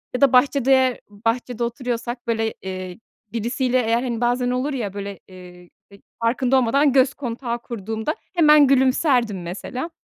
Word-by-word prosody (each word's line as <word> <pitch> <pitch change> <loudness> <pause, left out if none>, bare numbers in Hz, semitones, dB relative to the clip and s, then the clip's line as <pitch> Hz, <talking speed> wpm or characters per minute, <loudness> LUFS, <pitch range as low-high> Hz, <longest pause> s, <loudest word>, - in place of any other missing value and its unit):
ya 250 - -3
da 275 -2 +5
bahçede 260 -1 +3
bahçede 230 +3 -2
oturuyorsak, 240 0 -4
böyle, 225 -1 0
eee, 185 0 -6 0.3
birisiyle 245 +3 0
eğer, 230 +2 0
hani, 235 -2 -3
bazen 245 +1 +1
olur 255 +4 -1
ya, 210 -7 -3
böyle, 200 -1 -6
eee, 180 -1 -14 0.2
ya 200 - -14 0.3
farkında 255 +3 +2
olmadan 270 +3 +3
göz 265 0 +4
kontağı 240 -2 -4
kurduğumda 225 - -4 0.2
hemen 300 -4 +6
gülümserdim, 255 - +2
mesela, 250 - -5
240 Hz, 145 wpm, -22 LUFS, 220-260 Hz, 0.3 s, hemen